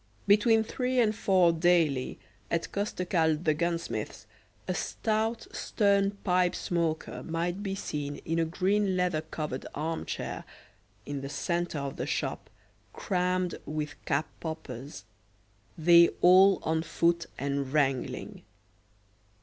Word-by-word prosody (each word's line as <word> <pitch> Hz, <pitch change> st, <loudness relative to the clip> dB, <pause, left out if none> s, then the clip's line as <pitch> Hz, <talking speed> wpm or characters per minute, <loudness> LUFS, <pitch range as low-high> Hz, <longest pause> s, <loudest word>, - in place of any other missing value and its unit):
Between 220 Hz, +2 st, +5 dB
three 250 Hz, +3 st, -1 dB
and 215 Hz, -2 st, +3 dB
four 185 Hz, -4 st, +4 dB
daily, 160 Hz, -6 st, +2 dB, 0.3 s
at 170 Hz, 0 st, -1 dB
Costecalde 175 Hz, -5 st, 0 dB
the 155 Hz, -, +4 dB
gunsmith's, 170 Hz, +1 st, -3 dB, 0.4 s
a -, -, 0 dB
stout 220 Hz, +1 st, -1 dB
stern 200 Hz, -1 st, +1 dB
pipe 180 Hz, -1 st, +2 dB
smoker 165 Hz, -2 st, -2 dB
might 170 Hz, +3 st, -2 dB
be 195 Hz, -2 st, -3 dB
seen 145 Hz, -6 st, -4 dB
in 165 Hz, +1 st, 0 dB
a 165 Hz, -, +2 dB
green 190 Hz, +3 st, +1 dB
leather 180 Hz, -4 st, +1 dB
covered 155 Hz, -4 st, -5 dB
arm 160 Hz, +2 st, -3 dB
chair -, -, -4 dB, 0.6 s
in 145 Hz, -1 st, -4 dB
the 135 Hz, -, -5 dB
centre 170 Hz, +2 st, -2 dB
of 140 Hz, -1 st, -4 dB
the -, -, -3 dB
shop -, -, -3 dB, 0.4 s
crammed 180 Hz, -1 st, 0 dB
with 150 Hz, -1 st, -3 dB
cap 145 Hz, +3 st, +1 dB
poppers, 140 Hz, -, -7 dB, 0.7 s
they 170 Hz, +1 st, +7 dB
all 190 Hz, +2 st, +7 dB
on 160 Hz, 0 st, +1 dB
foot 170 Hz, +1 st, +1 dB
and 140 Hz, 0 st, -2 dB
wrangling. 135 Hz, -3 st, -1 dB
170 Hz, 125 wpm, -29 LUFS, 155-190 Hz, 0.7 s, they